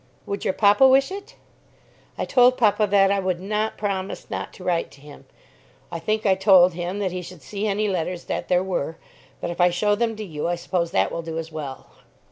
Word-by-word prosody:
"Would 200 0 -4
your 190 - 0
papa 205 +6 +5
wish 270 +4 +4
it?" 400 +1 -8 0.8
"I - - -2
told 250 0 +4
papa 210 -2 +3
that 195 -1 +4
I 200 - +1
would 185 -2 -1
not 210 +3 -2
promise 195 -2 -4
not - - -4
to 185 - -12
write 175 -2 0
to - - -17
him. 145 0 -14 0.7
I 170 - -4
think 215 +6 -1
I 195 - +5
told 185 -2 +5
him 175 +3 -4
that 195 -3 -1
he 180 0 -4
should 175 -4 -12
see 205 +7 -3
any 210 +1 0
letters 180 -2 -2
that - - -4
there 180 0 +2
were. 165 -4 -3 0.4
But - - -3
if 175 - -3
I 175 - +6
show 205 +4 +1
them 225 +1 0
to 215 0 -6
you, 155 -3 -4
I 175 - 0
suppose 170 0 -2
that - - +1
will 170 - -3
do 165 -1 -6
as 165 0 -5
well." 145 -4 -7
190 Hz, 225 wpm, -23 LUFS, 175-210 Hz, 0.8 s, I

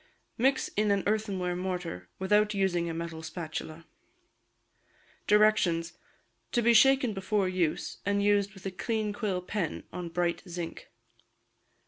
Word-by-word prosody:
Mix 265 +4 +2
in 210 0 0
an 200 -1 +2
earthenware 200 -4 0
mortar, 180 - -4
without 210 +2 +2
using 175 -3 +1
a - - -3
metal 165 -1 -5
spatula. 160 0 -6 1.4
Directions. 210 -6 +3 0.6
To 240 - +2
be 235 +1 +5
shaken 265 0 +5
before 195 0 0
use, 180 -4 -1
and 200 0 +1
used 205 -1 +2
with 195 - -14
a 195 - -2
clean 215 +2 -2
quill 205 -5 -2
pen, 185 -3 -3
on 180 -1 -5
bright 175 0 -1
zinc. 170 -1 -6
190 Hz, 130 wpm, -29 LUFS, 175-210 Hz, 1.4 s, be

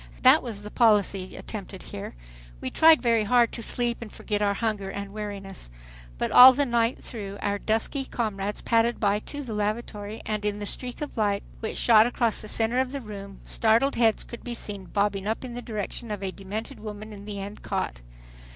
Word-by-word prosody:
That 265 +4 +7
was 215 -5 -6
the 210 - -8
policy 205 -5 +2
attempted 195 -3 -7
here. 100 - -7 0.4
We 130 - -4
tried 320 -2 +6
very 230 -2 +3
hard 240 +1 +4
to 235 - -6
sleep 240 +1 -1
and 225 -3 -7
forget 210 -1 -3
our 200 -1 +2
hunger 210 -3 -2
and 200 0 -6
weariness. 200 - -6 0.5
But - - -1
all 255 +1 +11
the 285 +2 +1
night 235 -1 +1
through 200 -4 -6
our 205 0 -1
dusky 225 +6 -1
comrades 210 -4 -3
padded 230 +1 +2
by 205 -1 +2
to 290 +6 -7
the 235 -4 -6
lavatory, 210 0 -3
and 215 -1 -2
in 205 0 -1
the 205 - -5
streak 250 +6 -5
of 295 - -6
bright 220 - +1
light 200 -1 0 0.2
which 220 - -4
shot 225 -1 +6
across 235 -2 0
the 215 - -7
center 225 +3 +1
of 260 0 0
the 280 - -2
room, 200 -3 -9
startled 230 +5 +2
heads 225 -2 +2
could 235 - -10
be 240 -1 -4
seen 205 -4 -6
bobbing 200 +1 0
up 220 +4 -2
in 245 - -7
the 245 - -5
direction 225 0 -5
of 205 -2 -4
a 190 - -2
demented 210 +7 -6
woman 215 0 -7
in 200 -1 -10
the 205 -1 -5
end 200 +2 -7
cot. - - -3
215 Hz, 205 wpm, -26 LUFS, 200-235 Hz, 0.5 s, all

